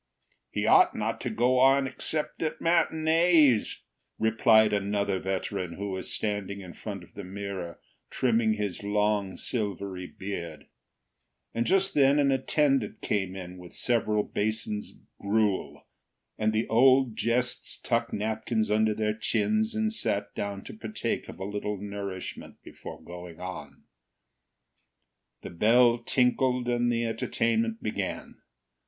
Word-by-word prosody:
"He -, -, -2 dB
ought -, -, +5 dB
not -, -, -2 dB
to -, -, -2 dB
go 125 Hz, +2 st, +2 dB
on 135 Hz, +1 st, +5 dB
except 150 Hz, +3 st, -2 dB
at 160 Hz, -1 st, -2 dB
matinees," 160 Hz, -5 st, +3 dB, 0.3 s
replied 110 Hz, -1 st, +4 dB
another 100 Hz, -1 st, 0 dB
veteran, 95 Hz, -1 st, -3 dB
who 100 Hz, +2 st, -5 dB
was 95 Hz, 0 st, -4 dB
standing 100 Hz, -2 st, -2 dB
in 90 Hz, -2 st, -10 dB
front -, -, -7 dB
of -, -, -18 dB
the -, -, -8 dB
mirror 95 Hz, -3 st, -6 dB, 0.3 s
trimming 115 Hz, -3 st, +2 dB
his 105 Hz, -4 st, -3 dB
long, 105 Hz, -1 st, 0 dB
silvery 100 Hz, -5 st, -3 dB
beard, 85 Hz, -6 st, -7 dB, 0.9 s
and 115 Hz, +1 st, -1 dB
just 195 Hz, +1 st, +3 dB
then 140 Hz, 0 st, +4 dB
an 140 Hz, -2 st, +3 dB
attendant 135 Hz, -2 st, +1 dB
came 95 Hz, -2 st, -1 dB
in 90 Hz, -1 st, -8 dB
with 90 Hz, -1 st, -12 dB
several 110 Hz, -3 st, +1 dB
basins 105 Hz, 0 st, -2 dB
of -, -, -18 dB, 0.2 s
gruel, 105 Hz, -1 st, 0 dB, 0.5 s
and 110 Hz, 0 st, +1 dB
the 110 Hz, +1 st, 0 dB
old 130 Hz, 0 st, +4 dB
Jests 125 Hz, +3 st, 0 dB
tucked 115 Hz, -1 st, -1 dB
napkins 110 Hz, +1 st, -1 dB
under 110 Hz, 0 st, +2 dB
their 105 Hz, 0 st, 0 dB
chins 215 Hz, -, 0 dB
and 220 Hz, 0 st, +1 dB
sat 100 Hz, -, -1 dB
down 100 Hz, -1 st, -4 dB
to -, -, -9 dB
partake 215 Hz, -, -4 dB
of -, -, -10 dB
a 95 Hz, -, -4 dB
little 105 Hz, +1 st, -3 dB
nourishment 100 Hz, -1 st, -7 dB
before -, -, -10 dB
going 90 Hz, -1 st, -10 dB
on. 75 Hz, -7 st, -8 dB, 1.6 s
The -, -, -7 dB
bell 120 Hz, +6 st, +4 dB
tinkled 125 Hz, +1 st, +1 dB
and 120 Hz, 0 st, +1 dB
the 120 Hz, 0 st, 0 dB
entertainment 115 Hz, 0 st, -1 dB
began. 105 Hz, -, -4 dB
110 Hz, 135 wpm, -28 LUFS, 100-125 Hz, 1.6 s, ought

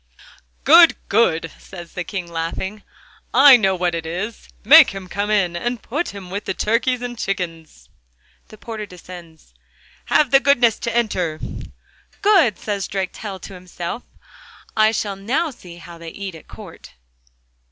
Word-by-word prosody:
'Good, -, -, +7 dB
good!' 165 Hz, -1 st, +2 dB
said 175 Hz, -3 st, -11 dB
the 180 Hz, -, -5 dB
King 185 Hz, 0 st, -5 dB
laughing. 170 Hz, +5 st, -4 dB, 0.5 s
'I 275 Hz, -2 st, +9 dB
know 195 Hz, -4 st, +1 dB
what 175 Hz, -1 st, -1 dB
it 165 Hz, -1 st, -4 dB
is! 195 Hz, -, -5 dB
Make -, -, +8 dB
him 190 Hz, -1 st, -7 dB
come 200 Hz, +3 st, -3 dB
in, 195 Hz, -5 st, +1 dB
and 240 Hz, +7 st, -3 dB
put 300 Hz, +8 st, -3 dB
him 195 Hz, -3 st, -10 dB
with 200 Hz, +2 st, -4 dB
the 190 Hz, -, -3 dB
turkeys 245 Hz, +3 st, 0 dB
and 245 Hz, 0 st, -5 dB
chickens.' 170 Hz, -6 st, -5 dB, 0.6 s
The 215 Hz, -, -14 dB
porter 215 Hz, -1 st, -7 dB
descends. 175 Hz, -, -13 dB, 0.5 s
'Have 290 Hz, -4 st, +2 dB
the 270 Hz, -, +7 dB
goodness 245 Hz, -5 st, +3 dB
to 235 Hz, 0 st, -2 dB
enter.' 180 Hz, -9 st, -1 dB, 0.8 s
'Good!' 365 Hz, -, +4 dB
says 200 Hz, -3 st, -3 dB
Drakestail 195 Hz, +1 st, -5 dB
to -, -, -10 dB
himself, 180 Hz, +4 st, -6 dB, 0.7 s
'I 215 Hz, 0 st, +4 dB
shall 205 Hz, -3 st, -2 dB
now 265 Hz, -, -1 dB
see 180 Hz, -8 st, -13 dB
how 170 Hz, 0 st, -12 dB
they 165 Hz, 0 st, -8 dB
eat 195 Hz, +2 st, -7 dB
at 160 Hz, -, -14 dB
court. -, -, -13 dB
195 Hz, 150 wpm, -20 LUFS, 175-230 Hz, 0.8 s, I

